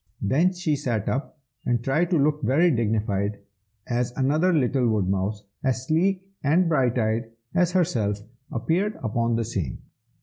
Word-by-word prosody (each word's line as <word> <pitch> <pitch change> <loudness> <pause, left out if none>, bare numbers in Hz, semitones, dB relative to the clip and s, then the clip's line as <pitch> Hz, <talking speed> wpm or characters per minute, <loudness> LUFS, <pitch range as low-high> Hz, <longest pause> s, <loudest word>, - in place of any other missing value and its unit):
Then 155 - +2
she 175 -4 0
sat 120 -7 -2
up, 135 +4 -2 0.3
and 120 -1 0
tried 155 +7 +1
to 175 - +3
look 150 +1 +2
very 160 +7 +3
dignified, 105 -4 0 0.5
as 120 0 -1
another 150 +7 +2
little 130 -5 +2
woodmouse, 100 0 0 0.2
as 130 -2 0
sleek 185 +5 +1 0.2
and 165 +5 +3
bright 130 -6 +2
eyed 110 0 0 0.2
as 180 -1 +2
herself, 115 - +1 0.3
appeared 165 - 0
upon 115 0 0
the 115 0 0
scene. 95 - -3
130 Hz, 145 wpm, -25 LUFS, 110-160 Hz, 0.5 s, to